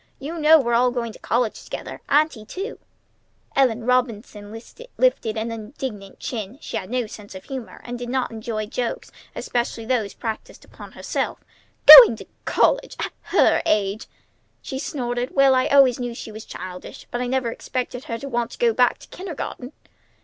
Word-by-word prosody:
"You 320 +5 -6
know 315 +1 +7
we're 240 -4 0
all 245 +2 +4
going 240 -2 -3
to - - -14
college 235 -2 -1
together, - - -7
Auntie, 295 -6 +2
too!" 385 - -6 0.8
Ellen 245 -4 +2
Robinson 230 -4 -1
lifted 245 - -2
an 225 +1 -3
indignant 215 -3 -7
chin. 220 0 -5
She - - -7
had 185 - -4
no 250 0 -1
sense 205 -2 -11
of 185 - -9
humor, 260 -4 -8
and 245 0 -6
did 245 0 -6
not 260 -1 -1
enjoy 220 -1 -4
jokes, 235 +2 -4 0.2
especially 235 -2 -3
those 220 -5 -1
practised 220 -2 -6
upon - - -13
herself. - - -3 0.5
"Going - - +12
to - - -11 0.2
college! - - +1
At - - -3 0.2
her - - +5
age!" 205 0 0 0.6
she 265 - -5
snorted. 245 -4 -3
"Well, 275 -1 +5
I 255 0 +2
always 270 -3 +5
knew 245 -1 -4
she 225 - -8
was 215 +1 -9
childish, 180 0 -9
but 240 - -2
I 250 - -2
never 255 -2 -1
expected 250 +1 -5
her 230 - -4
to 275 - -7
want 240 -2 -1
to - - -11
go 470 -2 +2
back - - +3
to - - -16
kindergarten!" 315 -7 -7
245 Hz, 175 wpm, -22 LUFS, 220-265 Hz, 0.8 s, Going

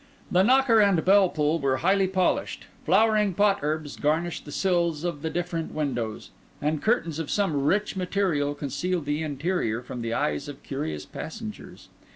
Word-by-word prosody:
The 180 - +4
knocker 250 +1 +5
and 200 -6 +3
bell 195 0 +6
pull 155 +1 0
were 135 -2 +1
highly 190 +4 +2
polished; 185 -1 0 0.2
flowering 210 +1 +3
pot 200 0 +3
herbs 155 -1 -2
garnished 160 +3 -1
the 145 - -9
sills 170 -3 0
of 170 -5 -3
the 160 - -2
different 170 -1 -3
windows; 120 -8 -3 0.3
and 150 0 -1
curtains 170 -9 0
of 160 - -4
some 160 -9 0
rich 205 +7 +1
material 180 -6 0
concealed 165 +4 -2
the 145 +2 -1
interior 145 -6 -1
from 120 0 -6
the 115 0 -2
eyes 75 -1 -1
of 145 -1 -9
curious 145 +3 -4
passengers. 215 +5 -8
165 Hz, 165 wpm, -26 LUFS, 145-195 Hz, 0.3 s, bell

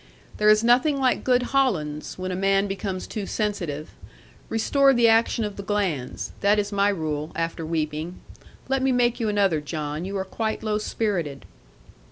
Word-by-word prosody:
There 210 0 +4
is 215 +1 +5
nothing 255 +5 +4
like 260 -2 +1
good 250 -1 +3
hollands, 160 - 0
when 185 0 -4
a - - -2
man 195 +1 +2
becomes 195 -1 -4
too 210 -3 -5
sensitive. 175 -9 -3 0.6
Restore 275 +4 +3
the 240 -1 +5
action 225 0 +3
of 205 -1 -6
the - - -4
glands; 195 -11 -2
that 205 +1 +3
is 205 0 -1
my 200 0 +2
rule, 155 -5 -2
after 165 0 -2
weeping. 155 +1 -3 0.5
Let 270 0 0
me 265 0 +2
make 245 -1 +2
you 225 -2 0
another, 195 -7 +2
John. 150 +1 -4
You 195 +2 -3
are 190 - -2
quite 220 +3 -3
low 215 -1 0
spirited.' 180 -11 -2
200 Hz, 175 wpm, -24 LUFS, 165-225 Hz, 0.6 s, is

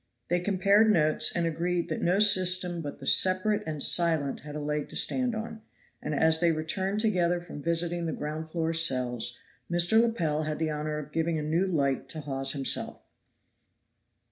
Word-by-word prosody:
They 175 +1 +1
compared 200 +3 +2
notes, 155 -5 +2
and 170 -1 0
agreed 170 +2 -2
that 155 - -4
no 180 +3 +1
system 185 -4 +4
but 145 -2 -7
the 135 - -10
separate 190 +7 +4
and 155 -3 0
silent 160 -5 +1
had 150 0 -10
a - - -4
leg 150 0 -3
to - - -11
stand 255 -3 0
on; 220 0 -7 0.4
and 150 - -4
as 160 +2 +3
they 170 0 +2
returned 190 +6 -2
together 180 -5 +1
from 170 -4 -10
visiting 170 +1 -1
the - - -2
ground 155 +2 -6
floor 165 0 -2
cells, 125 -7 +1 0.3
Mr. 175 +6 +3
Lepel 170 -10 -1
had 155 -1 -3
the 160 -1 -2
honor 150 0 -4
of 150 -1 -8
giving 165 +1 -1
a 155 - -3
new 165 +5 0
light 140 -7 -1
to 155 - -6
Hawes 135 -2 -3
himself. 135 -2 -2
165 Hz, 180 wpm, -27 LUFS, 150-180 Hz, 0.4 s, system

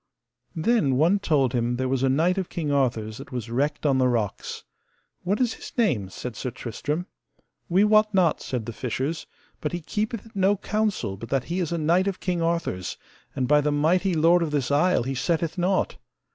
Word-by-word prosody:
Then 160 - +2
one 170 +9 +3
told 140 -9 +1
him 120 0 0
there 130 +1 -1
was 130 0 0
a 135 - +3
knight 170 +8 +2
of 185 - -3
King 155 -4 -2
Arthur's 115 -6 0
that 135 0 -10
was 120 -3 -5
wrecked 145 +5 -1
on 135 -2 +3
the 130 - +4
rocks. 115 -5 -2 0.6
What 195 +4 0
is 245 -3 +2
his - - -10
name? 135 - +1
said 120 +4 -7
Sir 125 - -3
Tristram. 145 +8 -4 0.6
We 185 +4 +4
wot 215 0 +4
not, 185 -5 +2
said 125 -4 -3
the 115 - -5
fishers, 135 +7 -3 0.3
but 150 - -3
he 175 - -1
keepeth 215 +6 -3
it 225 - -15
no 195 +1 +3
counsel 210 - -1
but 115 +3 -8
that 135 -2 +1
he 185 - 0
is 170 -3 -1
a 170 - 0
knight 170 +5 +2
of 195 -2 -2
King 180 -2 -1
Arthur's, 165 - -1 0.4
and 130 -2 0
by 150 +2 +5
the 150 0 0
mighty 170 +5 +2
lord 165 +3 +4
of 165 - 0
this 145 -3 -1
isle 155 0 +3
he 135 +2 -2
setteth 165 +4 -1
nought. 185 +2 +1
150 Hz, 205 wpm, -25 LUFS, 130-185 Hz, 0.6 s, by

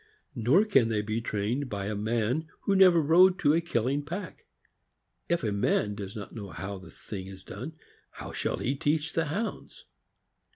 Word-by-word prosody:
Nor 135 - +3
can 135 - +3
they 105 -2 0
be 110 +2 -2
trained 115 +6 -2
by 100 -3 -3
a 105 - -2
man 115 +8 0
who 200 - +1
never 185 -3 +7
rode 180 +5 +5
to 145 - +3
a 165 - +3
killing 140 -3 0
pack. 175 +4 -7 0.8
If 170 -4 +1
a 110 - 0
man 100 +1 +1
does 100 -1 -7
not 105 -3 -7
know 105 -4 -7
how 95 +1 -6
the 95 -3 -13
thing 95 +2 -8
is 95 -1 -10
done, 125 - -7 0.4
how - - -8
shall - - -2
he 130 - -1
teach 150 +3 0
the 165 - +1
Hounds 215 - -4
125 Hz, 180 wpm, -28 LUFS, 105-165 Hz, 0.8 s, never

